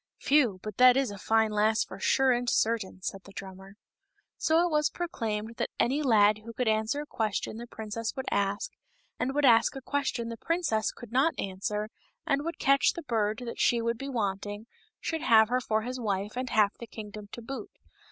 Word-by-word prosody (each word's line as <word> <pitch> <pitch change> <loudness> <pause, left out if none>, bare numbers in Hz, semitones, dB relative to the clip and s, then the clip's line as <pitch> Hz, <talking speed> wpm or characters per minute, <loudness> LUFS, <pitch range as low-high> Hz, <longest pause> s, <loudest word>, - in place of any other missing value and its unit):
(" - - -64
Phew! 255 -10 +3
but 215 -2 -6
that 255 0 +7
is 270 -5 +1
a 200 - -8
fine 220 +1 +2
lass 215 +1 +2
for - - -10
sure 265 -1 +3
and 245 0 +1
certain," 215 -6 0
said 195 - -4
the 200 - -12
drummer.) 190 0 -10 0.6
So 325 +2 +3
it 350 - -1
was 300 0 +2
proclaimed 225 -10 -4
that - - -1
any 275 +5 +2
lad 215 -5 +4
who 230 +2 -10
could 250 +1 -2
answer 220 +6 +1
a - - -12
question 215 -4 -2
the 240 +1 -8
princess 220 0 -5
would 265 -2 -4
ask, 200 - 0 0.5
and 265 +2 -1
would 295 -1 +3
ask 230 -1 +5
a - - -4
question 265 -4 -2
the 230 - -6
princess 305 -9 0
could 240 -2 -12
not 270 +7 +2
answer, 210 +2 -3 0.4
and 275 +1 +1
would 335 +2 -4
catch 275 0 +3
the 340 - -7
bird 220 -3 -1
that 235 - -6
she 240 - +3
would 230 0 -1
be 275 0 -5
wanting, 205 -2 -3 0.3
should 320 -2 -3
have 220 -6 +5
her 250 +1 +1
for 220 -2 0
his 250 +2 -4
wife 205 -2 -2
and 255 0 -3
half 210 -3 +3
of - - -36
the 235 - -8
kingdom 210 -1 -9
to 235 - -7
boot. 240 -2 -6
230 Hz, 210 wpm, -29 LUFS, 210-260 Hz, 0.6 s, that